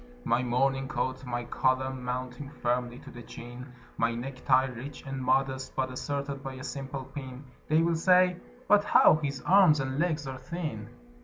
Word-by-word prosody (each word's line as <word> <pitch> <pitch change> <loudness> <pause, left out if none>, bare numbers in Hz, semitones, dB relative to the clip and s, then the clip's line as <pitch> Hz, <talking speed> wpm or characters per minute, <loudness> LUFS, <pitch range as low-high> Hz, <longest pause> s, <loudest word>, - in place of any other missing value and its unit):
"] 245 - -23
My 120 - +3
morning 135 +2 +1
coat, 130 0 -2
my 120 0 -2
collar 130 +2 +1
mounting 125 +1 -5
firmly 125 -3 -2
to - - -11
the 120 - -10
chin, 120 +2 -10 0.3
My 115 0 +1
necktie 130 +1 +1
rich 130 +3 -8
and 135 -1 -4
modest, 130 +1 0
but 130 -1 -1
asserted 140 +1 -4
by 135 -1 -6
a 130 - -8
simple 135 -1 -5
pin 135 -1 -8 0.2
[They 155 +2 +3
will 170 0 +2
say: 180 +1 +4 0.3
"But 205 0 +5
how 180 - +6
his 140 -4 -4
arms 180 -6 +6
and 135 +1 -2
legs 155 -3 0
are 130 -1 -6
thin!" 130 -7 -5
130 Hz, 175 wpm, -29 LUFS, 125-145 Hz, 0.3 s, how